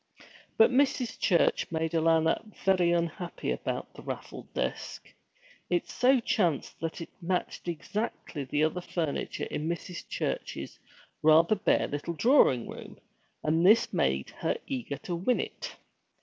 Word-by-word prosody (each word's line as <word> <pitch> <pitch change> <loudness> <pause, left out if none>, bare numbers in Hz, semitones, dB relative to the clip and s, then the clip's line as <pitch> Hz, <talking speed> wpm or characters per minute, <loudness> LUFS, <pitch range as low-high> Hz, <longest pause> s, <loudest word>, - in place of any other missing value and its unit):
But 225 - +6
Mrs. 255 -2 +1
Church 175 -3 +2
made 160 0 -1
Alanna 165 -1 +3 0.2
very 185 -3 +4
unhappy 170 +1 -2
about - - -3
the - - -11
raffled - - -7
desk. - - -4 0.6
It 175 -1 +1
so 255 +1 +3
chanced 175 - 0
that 165 +1 -4
it 165 - -8
matched 180 0 -2
exactly 170 -2 -4
the 145 +3 0
other 160 +3 0
furniture 165 -4 -3
in 155 +2 -3
Mrs. 170 +1 -5
Church's - - -4 0.4
rather 160 +5 +6
bare 205 - +2
little 145 +4 -4
drawing 160 - +4
room, - - -9 0.5
and 160 +2 +2
this 220 +5 +5
made 65 0 0
her - - 0
eager 135 +2 -4
to 180 - -3
win 190 +9 +1
it. - - -5
170 Hz, 135 wpm, -29 LUFS, 155-190 Hz, 0.6 s, But